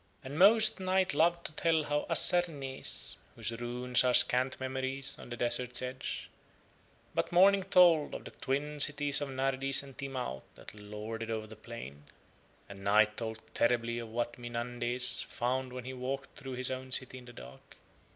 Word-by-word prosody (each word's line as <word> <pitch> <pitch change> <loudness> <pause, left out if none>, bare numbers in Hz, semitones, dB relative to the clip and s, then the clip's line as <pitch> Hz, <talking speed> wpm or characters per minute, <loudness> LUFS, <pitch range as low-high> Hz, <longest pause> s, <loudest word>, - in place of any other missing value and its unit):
And 140 +3 -6
most 215 +2 +6
Night 185 -1 +1
loved 170 +3 +1
to - - -4
tell 160 -1 0
of 150 - -1
Assarnees, 145 -7 +1 0.2
whose - - -3
ruins 125 +2 +1
are 125 -1 +3
scant 130 +1 +3
memories 130 +1 -3
on - - -11
the 120 - -6
desert's 120 +1 +2
edge, 130 +1 -5 0.9
but - - -2
Morning 195 +3 +5
told 180 -5 +4
of - - -8
the - - -9
twin 145 +3 -4
cities 145 0 +5
of 145 - -4
Nardis 135 +1 +1
and 135 -2 -13
Timaut 130 - -5
that - - -12
lorded 105 +2 -7
over 110 -1 -3
the 110 0 -12
plain. 110 - -10 0.6
And 100 -1 -11
Night 105 +2 +3
told 110 -1 -6
terribly 115 0 0
of 115 -1 -8
what 120 +1 -4
Mynandes 120 +1 -1
found 130 +1 -3
when 125 -1 -8
he 130 - -6
walked 135 +2 -5
through 135 -2 -8
his 130 +1 +3
own 130 0 -6
city 130 0 0
in 125 - -15
the 120 - -13
dark. 65 - -14
130 Hz, 170 wpm, -31 LUFS, 120-140 Hz, 0.9 s, most